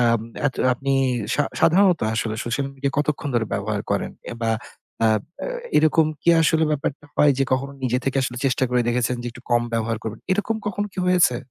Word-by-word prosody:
আম 115 -2 +3 0.3
এত 135 - -1 0.2
আপনি 135 +2 -2 0.4
সা 145 - +2 0.2
সাধারণত 180 0 +4
আসলে 110 0 -1
social 120 +4 -1
media 135 0 -1
কতক্ষণ 150 -1 -1
ধরে 110 -2 +1
ব্যবহার - - -1
করেন? - - 0 0.2
অ্যা - - -5
বা 115 - +1 0.5
আ - - +6 0.3
অ্যা - - -3 0.3
এরকম 155 0 +4 0.2
কি - - -1
আসলে 160 0 +3
ব্যাপারটা 145 0 -2
হয় 145 -1 +5
যে 135 - +3
কখনো 135 +2 0
নিজে 125 0 +1
থেকে 135 0 -1
আসলে 125 -1 -3
চেষ্টা 130 -1 +2
করে 125 0 +2
দেখেছেন 125 +1 +1
যে - - -5
একটু 120 +1 -14
কম 120 0 +4
ব্যবহার 115 0 0
করবেন, 110 0 -6
এরকম 210 +3 0
কখন 205 0 -1
কি - - -12
হয়েছে? 180 -9 +4
135 Hz, 200 wpm, -23 LUFS, 120-155 Hz, 0.5 s, আ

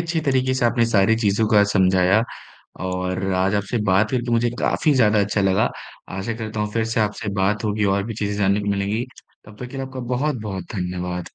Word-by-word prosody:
अच्छी 170 -1 -1
तरीके 130 -1 +2
से 130 - 0
आपने 120 0 +2
सारी 110 0 +3
चीज़ों 110 -1 +1
का 105 -1 +5
समझाया, 95 +2 +3 0.6
और 95 +1 -2
आज 95 +2 +1
आपसे 100 +4 -1
बात 100 +3 +3
करके 120 -2 -1
मुझे 120 +1 +2
काफ़ी 155 - +1
ज़्यादा 105 -4 +4
अच्छा 100 +1 0
लगा। 95 +2 +2 0.5
आशा 115 +4 -3
करता 110 -1 -5
हूँ, 105 0 -2
फिर 115 0 0
से 115 +1 -1
आपसे 105 0 -2
बात 100 +3 0
होगी, 105 0 0
और 100 0 +2
भी 115 +1 -5
चीज़ें 105 -1 -2
जानने 100 +1 +2
को 100 - -5
मिलेंगी। 100 +4 -1 0.4
तब 105 0 -13
तक 125 - -4
के - - -8
लिए 135 0 -3
आपका 130 -1 -7
बहुत-बहुत 115 -9 -2
धन्यवाद। 90 -1 -4
105 Hz, 205 wpm, -22 LUFS, 95-115 Hz, 0.6 s, का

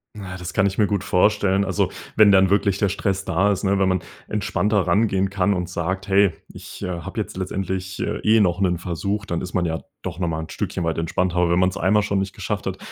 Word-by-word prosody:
Na, 95 -3 -7
das 90 -1 -7
kann 105 - +3
ich 100 - -3
mir 105 -2 +3
gut 100 -1 -1
vorstellen, 100 0 +2
also, - - 0 0.3
wenn 105 -2 +7
dann 95 -1 +5
wirklich 100 -1 +2
der 100 0 +1
Stress 100 0 -1
da 95 +2 +1
ist, 95 - -5
ne, 100 0 +2
wenn 95 - +3
man 95 -1 +1 0.3
entspannter 105 -1 0
rangehen 95 +1 +2
kann 100 0 +1
und 90 -2 -3
sagt: 95 +2 -3
„Hey, 100 -2 +4 0.2
ich, - - -11
äh, - - -2
habe 85 -2 -6
jetzt - - -7
letztendlich 95 0 -3
eh 110 +1 +2
noch 90 -2 +2
'nen 90 -3 +1
Versuch.“ 100 +4 -3
Dann 85 -4 -2
ist 90 - -6
man 90 - +1
ja 80 -1 -3 0.2
doch 90 -2 -6
nochmal 85 -3 -1
'n 80 - -10
Stückchen - - -3
weit 80 0 -1
entspannter, 90 +2 -1
aber 90 -1 +3
wenn 85 - +3
man 90 0 +4
es 95 - -7
einmal 105 +3 +3
schon 100 -1 0
nicht 95 0 -3
geschafft - - -3
hat, - - -3
95 Hz, 240 wpm, -22 LUFS, 90-100 Hz, 0.3 s, wenn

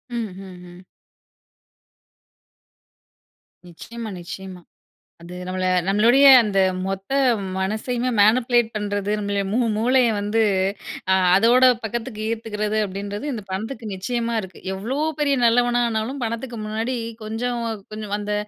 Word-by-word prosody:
ம்ஹ்ம், 195 -5 -6
ம். 175 - -14 2.9
நிச்சியமா, 225 +6 -8
நிச்சியமா. 185 +1 -8 0.6
அது 170 +1 -10
நம்மள 185 0 -2 0.2
நம்மளுடைய 230 +8 +4 0.2
அந்த 200 -3 0 0.3
மொத்த 195 +3 -5 0.5
மனசையுமே 220 +6 -1
மேனிபுலேட் 240 +2 +3
பண்றது. 205 -1 -2
நம்மளோட 200 -1 -1
மூ 230 - +1 0.2
மூளைய 250 +2 +3
வந்து 210 +2 0 0.9
அதோட 235 +5 +4 0.2
பக்கத்துக்கு 225 0 -4
ஈர்த்துக்கிறது 215 -2 -2
அப்டின்றது 200 +5 -6
இந்த 220 -4 -6
பணத்துக்கு 220 +4 -5
நிச்சியமா 235 +4 -2
இருக்கு. 190 -3 -11
எவ்வளோ 220 +8 -4 0.2
பெரிய 280 -2 +2
நல்லவனா 240 +1 +3
ஆனாலும் 230 +5 -3
பணத்துக்கு 230 +1 -5
முன்னாடி 225 +4 -2 0.3
கொஞ்சம், 235 +3 -3 0.3
கொஞ்சம் 215 -1 -4
அந்த 210 0 -3
220 Hz, 105 wpm, -22 LUFS, 200-240 Hz, 2.9 s, நம்மளுடைய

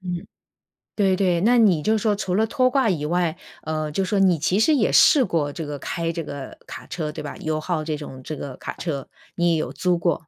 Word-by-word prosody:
嗯， 180 -2 -5 0.7
对 195 -3 +3
对。 180 -3 +1
那 240 +5 +4
你 195 -9 +4
就 220 +6 +2
说 210 0 +1
除 190 -3 -2
了 220 - +3
拖 255 +1 +2
挂 265 -3 +2
以 155 -6 -1
外， 170 0 0 0.3
呃， 155 -1 -3
就 190 +6 0
说 200 +2 0
你 185 -4 +4
其 185 +6 +1
实 305 +8 +4
也 245 - +2
试 300 -4 +6
过 160 -6 -1
这 160 - -5
个 145 -1 -5
开 165 +3 -2
这 165 0 -4
个 140 -2 -8
卡 - - -9
车， 155 -3 -4
对 150 - -7
吧 145 - -6
？U-Haul 155 +1 -2
这 155 -1 -3
种 135 -3 -9
这 155 - -5
个 140 -2 -7
卡 - - -6
车， 145 -6 -4 0.3
你 175 0 +2
也 - - +3
有 155 - -2
租 180 -1 +1
过。 170 -2 -1
170 Hz, 275 characters per minute, -23 LUFS, 155-195 Hz, 0.7 s, 试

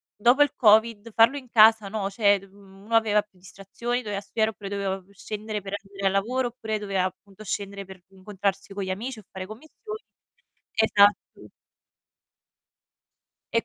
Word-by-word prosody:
dopo 245 +6 +4
il 290 - 0
COVID 220 -1 +4
farlo 230 +5 +5
in 255 -3 -10
casa, 220 -2 +6
no, 200 -2 -2
cioè, 200 -1 +3
mhmm, 195 0 -18
uno 230 +1 -1
aveva 210 -2 +4
più 205 -3 -27
distrazioni, 200 +6 -4
doveva 205 -3 -4
studiare 220 +2 0
oppure 200 -2 -9
doveva 195 -1 -2
pu 200 +2 -24
scendere 210 +1 -5
per 195 +1 -8
andare 195 0 -3
al - - +2
lavoro 245 +6 0
oppure 220 -3 -4
doveva 195 -3 -1
appunto 195 +2 -8
scendere 200 0 -4
per 190 -1 -13
incontrarsi 195 0 -4
con 200 - -4
gli 190 - -5
amici 230 +5 -5
o 210 - -15
fare 185 0 -6
commissioni. 315 - -10 0.7
Esatto. 205 -2 +2 2.0
E 230 - +2
205 Hz, 165 wpm, -25 LUFS, 195-225 Hz, 2.0 s, casa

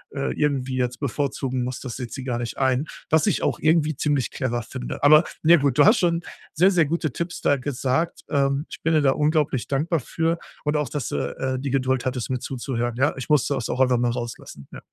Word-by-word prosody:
äh, 140 - -1
irgendwie 135 -3 -1
jetzt 125 -1 -1
bevorzugen 135 -2 -2
muss, 125 0 -5
das 125 -3 -6
sieht 125 -3 -6
sie 130 - -6
gar 125 -3 -2
nicht 120 -1 -5
ein. 130 +2 +1 0.2
Was 160 -1 +3
ich - - +1
auch - - 0
irgendwie 155 -1 +2
ziemlich 145 -4 0
clever 120 -3 -2
finde. - - -7
Aber, 155 +3 +7 0.2
ne, 170 0 +7
gut, 140 -3 +1
du - - +7
hast 220 +3 +6
schon 170 -1 +1 0.3
sehr, 185 +5 +4
sehr 170 -4 +3
gute 155 -1 -1
Tipps 170 +1 -4
da 140 - +3
gesagt. 135 +4 -1
Ähm, 140 0 +1
ich - - -9
bin 165 - +2
dir 155 - +4
da 135 -2 +4
unglaublich 150 -4 +1
dankbar 155 +4 0
für 165 +5 -1 0.2
und 150 0 0
auch, 150 -2 -1
dass 145 -5 -3
du, - - -2 0.2
äh, 130 -1 -2
die 140 - -3
Geduld 130 -1 0
hattest, 125 -2 -2
mir 130 -1 -1
zuzuhören, 120 -2 -3
ja? 145 +3 +2
Ich 130 - -6
musste 145 -1 +3
das 125 -4 -3
auch 130 - -1
einfach 125 -2 +4
mal 120 -1 +1
rauslassen. 120 - -7
Ja. - - -7
135 Hz, 230 wpm, -23 LUFS, 125-155 Hz, 0.3 s, Aber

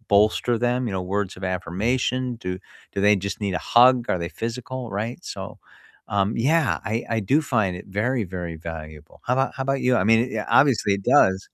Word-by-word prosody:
bolster 110 +3 +3
them? 125 +1 +1
You 100 - -3
know, 95 - -2
words 105 -2 -2
of - - -11
affirmation? 115 +9 -1 0.2
Do 90 - -2 0.4
do - - -13
they 105 0 +6
just 100 - -3
need 100 -2 -1
a 90 - -1 0.2
hug? 125 +2 +8 0.2
Are 90 - 0
they 85 - -4
physical, 125 +3 -4 0.2
right? 115 +2 -5
So, - - -7 0.7
um, 100 0 +2 0.2
yeah, 160 -4 +3
I 110 - -3 0.2
I - - +2
do 145 - +6 0.2
find 105 -5 +2
it - - -13
very, 125 -1 0
very 85 -2 -5
valuable. 75 -2 -11
How 125 - +1
about 135 0 +1
how 135 - -4
about 135 0 0
you? 125 - +4
I 105 - +2
mean, 115 0 +6
y - - 0
a - - -7
obviously 130 -7 +3
it - - -13
does. 95 0 +4
110 Hz, 215 wpm, -23 LUFS, 95-125 Hz, 0.7 s, hug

